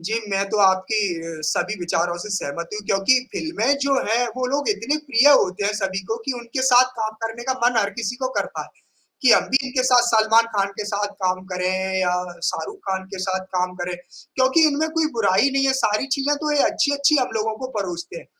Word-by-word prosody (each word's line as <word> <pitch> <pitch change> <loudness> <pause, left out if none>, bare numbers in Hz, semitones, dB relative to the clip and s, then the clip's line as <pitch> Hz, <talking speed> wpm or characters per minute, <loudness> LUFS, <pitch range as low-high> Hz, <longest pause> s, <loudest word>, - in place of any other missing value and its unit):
जी, 220 +7 -2
मैं 195 0 +1
तो 210 - -1
आपकी 190 -4 +1
अ, - - -9
सभी 195 +6 0
विचारों 175 0 -1
से 195 - -7
सहमत 170 +3 -5
हूँ 210 - -4
क्योंकि 195 +7 +3
फ़िल्में 285 -5 0
जो 280 0 +1
हैं 235 +3 +2
वो 255 0 -1
लोग 285 +1 0
इतने 295 - 0
प्रिय 270 +1 +5
होते 200 -7 +3
हैं 205 - +1
सभी 195 -2 -2
को 225 - 0
कि 270 - 0
उनके 240 +3 -4
साथ 255 -1 +6
काम 220 0 -2
करने 225 +1 -4
का - - +4
मन 245 0 +1
हर 200 - -1
किसी 230 +1 -3
को 260 0 -2
करता - - -3
है, - - -13 0.5
कि 255 - +6
हम - - +5
भी 265 0 +2
इनके 255 0 -1
साथ 250 -1 +5
सलमान 225 0 +4
खान 200 0 +1
के - - -3
साथ 205 0 -3
काम 185 0 -1
करें 185 +1 -1
या 180 -1 +1 0.4
शाहरुख 410 0 -5
खान 190 0 -1
के - - -7
साथ 190 0 -2
काम 180 0 -1
करें, 175 0 -4 0.4
क्योंकि 265 +5 +4
इनमें 305 +2 -1
कोई 320 0 +1
बुराई 225 +6 +3
नहीं 275 0 +1
है, 265 - +3
सारी 215 +6 +1
चीज़ें 285 +1 +1
तो 300 0 -2
ये 285 - +4
अच्छी-अच्छी 285 -1 +2
हम 255 -3 +1
लोगों 220 0 -1
को 260 - -5
परोसते 180 - -5
हैं - - -14
220 Hz, 220 wpm, -22 LUFS, 190-265 Hz, 0.5 s, साथ